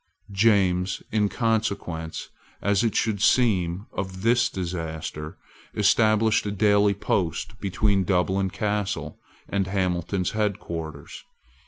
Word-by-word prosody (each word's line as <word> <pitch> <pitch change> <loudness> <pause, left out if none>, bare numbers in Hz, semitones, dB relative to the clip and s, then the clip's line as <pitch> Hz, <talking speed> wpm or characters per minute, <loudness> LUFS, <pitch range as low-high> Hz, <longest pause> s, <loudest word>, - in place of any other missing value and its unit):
James, 95 -3 +2
in 105 -1 +2
consequence, 100 -9 -2 0.3
as 100 +2 +1
it 115 - 0
should 105 -3 0
seem, 100 -7 +2
of 95 -1 -5
this 120 0 +3
disaster, 80 -4 -5 0.4
established 110 +1 +3
a - - -1
daily 100 0 +3
post 95 +1 -2
between 100 0 +1
Dublin 95 +1 +1
Castle 105 0 -2 0.3
and 100 -2 -1
Hamilton's 90 -1 -1
head 105 -2 0
quarters. 80 -5 -7
100 Hz, 110 wpm, -25 LUFS, 90-105 Hz, 0.4 s, this